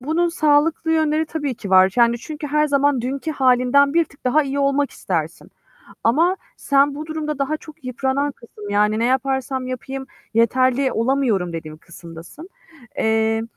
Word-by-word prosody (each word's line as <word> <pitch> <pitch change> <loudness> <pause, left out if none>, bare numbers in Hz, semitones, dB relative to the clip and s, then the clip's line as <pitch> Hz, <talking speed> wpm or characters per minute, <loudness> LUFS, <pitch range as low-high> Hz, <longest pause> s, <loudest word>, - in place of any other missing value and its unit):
Bunun 320 +6 0
sağlıklı 320 0 +2
yönleri 315 0 +1
tabii 295 -4 -3
ki 200 -3 -8
var. 190 0 +5
Yani 235 0 +3
çünkü 300 +4 -7
her 300 +1 +1
zaman 285 -2 +2
dünkü 270 +6 -3
halinden 265 +1 +3
bir 335 0 +4
tık 280 - -23
daha 255 +5 +3
iyi 275 0 -3
olmak 280 0 +1
istersin. 165 -2 -4 0.5
Ama 330 +11 +3 0.2
sen 280 0 +2
bu 305 +2 -7
durumda 305 -2 -4
daha 275 +3 -1
çok 310 -1 -15
yıpranan 265 +3 -1
kısım, 215 -5 -12
yani 210 +1 +2
"Ne 230 - 0
yaparsam 265 0 -1
yapayım 265 +1 -6 0.3
yeterli 255 +3 +2
olamıyorum." 230 -7 0
dediğin 155 -2 -7
kısımdasın. 170 - -12 0.5
Eee, 220 0 +1
270 Hz, 155 wpm, -20 LUFS, 230-300 Hz, 0.5 s, var